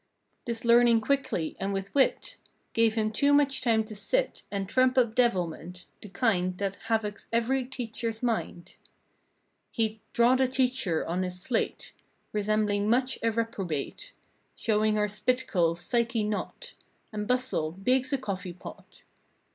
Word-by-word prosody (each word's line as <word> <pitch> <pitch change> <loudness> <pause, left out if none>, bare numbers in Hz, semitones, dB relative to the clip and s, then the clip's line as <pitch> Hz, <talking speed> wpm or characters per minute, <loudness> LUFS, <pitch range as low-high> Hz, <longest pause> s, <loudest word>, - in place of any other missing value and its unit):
This 235 -1 -4
learning 235 0 +6
quickly 215 - -1
and 195 +1 -2
with 195 0 -4
wit 285 - +1 0.4
Gave 225 -1 +3
him 215 -1 0
too 280 +6 +2
much 280 -2 +3
time 225 -3 +2
to 215 0 -10
sit - - -1
And 195 -1 -3
trump 255 +4 +2
up 235 -3 +3
devilment. 180 -7 -1 0.2
The 210 - -10
kind 185 -5 0
That 195 0 -2
havocs 220 -2 -1
every 245 +3 +1
teachers 230 -2 -5
mind. 225 -7 -3 0.9
He'd 220 -1 -1
"draw 240 +2 +4
the 260 0 +3
teacher" 250 -10 0
on 175 +3 -1
his 180 -1 -2
slate. 225 +5 -2 0.4
Resembling 210 0 +1
much 255 +3 +1
a 230 - +2
reprobate. 205 -10 -3 0.4
Show 215 -1 +1
her 210 0 +1
spit 250 +5 0
curls—psyche 210 +7 +1
knot 215 - -4 0.4
And 210 -1 -3
bustle, 250 -11 0
big's 255 +8 +1
a 275 - +2
coffee 190 -7 -5
pot. 175 - -12
225 Hz, 140 wpm, -28 LUFS, 200-250 Hz, 0.9 s, learning